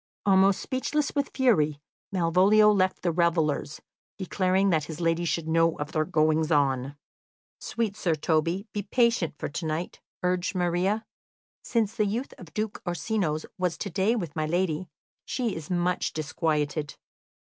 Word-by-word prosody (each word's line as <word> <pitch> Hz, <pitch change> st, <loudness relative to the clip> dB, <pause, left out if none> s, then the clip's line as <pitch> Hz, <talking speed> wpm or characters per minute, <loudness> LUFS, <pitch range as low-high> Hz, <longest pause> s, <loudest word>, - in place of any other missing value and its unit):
Almost 195 Hz, 0 st, +4 dB
speechless 285 Hz, +2 st, -1 dB
with 280 Hz, -1 st, 0 dB
fury, 155 Hz, -, +2 dB, 0.3 s
Malvolio 190 Hz, +4 st, +5 dB
left 190 Hz, -2 st, +1 dB
the 175 Hz, -, +2 dB
revellers, 160 Hz, -3 st, 0 dB, 0.4 s
declaring 190 Hz, 0 st, +1 dB
that 155 Hz, -3 st, +1 dB
his 160 Hz, +1 st, -7 dB
lady 165 Hz, 0 st, +1 dB
should 165 Hz, -1 st, -1 dB
know 165 Hz, 0 st, +2 dB
of 150 Hz, +1 st, -5 dB
their 155 Hz, -1 st, +1 dB
goings 155 Hz, -1 st, +2 dB
on. 135 Hz, -2 st, +1 dB, 0.6 s
"Sweet 225 Hz, -4 st, -2 dB
Sir 175 Hz, -6 st, 0 dB
Toby, 165 Hz, +5 st, 0 dB
be 205 Hz, -, -1 dB
patient 230 Hz, -, +1 dB
for -, -, -3 dB
to 155 Hz, -, -5 dB
night," 155 Hz, +3 st, -4 dB, 0.2 s
urged 180 Hz, +1 st, 0 dB
Maria. 185 Hz, +5 st, 0 dB, 0.6 s
"Since 225 Hz, -3 st, 0 dB
the 215 Hz, -2 st, +1 dB
youth 235 Hz, +7 st, -3 dB
of 175 Hz, -4 st, -12 dB
Duke 215 Hz, +2 st, -3 dB
Orsino's 175 Hz, -3 st, -1 dB
was 180 Hz, -2 st, 0 dB
to 200 Hz, -, -5 dB
day 195 Hz, +7 st, +2 dB
with 175 Hz, -10 st, -4 dB
my 155 Hz, -1 st, -1 dB
lady, 175 Hz, 0 st, -1 dB, 0.3 s
she 240 Hz, -6 st, -2 dB
is 160 Hz, -2 st, -7 dB
much 180 Hz, 0 st, 0 dB
disquieted. 155 Hz, -1 st, -1 dB
175 Hz, 150 wpm, -27 LUFS, 160-200 Hz, 0.6 s, Malvolio